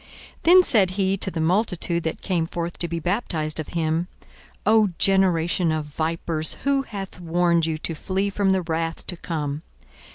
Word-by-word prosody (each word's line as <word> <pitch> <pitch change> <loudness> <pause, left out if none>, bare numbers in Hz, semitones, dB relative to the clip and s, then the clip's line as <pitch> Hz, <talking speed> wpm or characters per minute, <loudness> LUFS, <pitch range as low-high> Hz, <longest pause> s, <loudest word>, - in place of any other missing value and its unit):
42:003:007 - - -23 0.3
Then 365 +2 +7
said 205 - +4
he 190 0 0
to 190 - 0
the 170 - -5
multitude 175 0 0
that 160 - -3
came 170 -4 0
forth 170 0 -5
to 170 - 0
be 170 0 -3
baptized 165 -4 -1
of 155 - -4
him, 165 +1 -1 0.6
O 215 0 +4
generation 180 -3 +3
of 155 -1 -2
vipers, 160 +1 -2
who 275 0 +2
hath 200 -8 -7
warned 170 -1 +1
you 160 -1 -1
to 165 - -4
flee 195 +5 -2
from 195 -1 +1
the 190 -1 +1
wrath 165 0 -3
to 180 - -3
come? 150 -4 -4
170 Hz, 175 wpm, -23 LUFS, 160-195 Hz, 0.6 s, Then